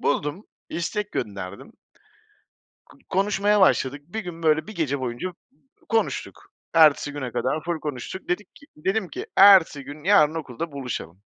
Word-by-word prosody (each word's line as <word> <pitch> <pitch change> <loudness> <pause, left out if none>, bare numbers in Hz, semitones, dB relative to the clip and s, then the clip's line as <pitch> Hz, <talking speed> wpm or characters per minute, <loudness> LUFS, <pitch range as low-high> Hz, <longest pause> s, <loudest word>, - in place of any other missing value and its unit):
Buldum, 150 +7 -1 0.3
istek 205 +5 -3
gönderdim. 100 -2 -5 1.2
K - - -18
konuşmaya 205 +1 +2
başladık, 145 -6 +3
bir 220 +6 -4
gün 175 -4 -8
böyle, 155 -1 +2
1 215 - -9
gece 145 -6 -1
boyunca, 125 +6 -3
uuu, 180 - -12 0.5
konuştuk. 225 -1 -2 0.2
Ertesi 155 -3 +5
güne 130 -4 -5
kadar 130 +6 -1
ful 170 -2 -2
konuştuk. 150 +5 -6
Dedik 180 +4 -3
ki 285 - -17
dedim 190 +5 -1
k: 390 - -6
"Ertesi 190 -8 +7
gün 145 +2 -10
yarın 160 -6 +5
okulda 160 0 -5
buluşalım." 125 - -6
160 Hz, 150 wpm, -24 LUFS, 140-190 Hz, 1.2 s, Ertesi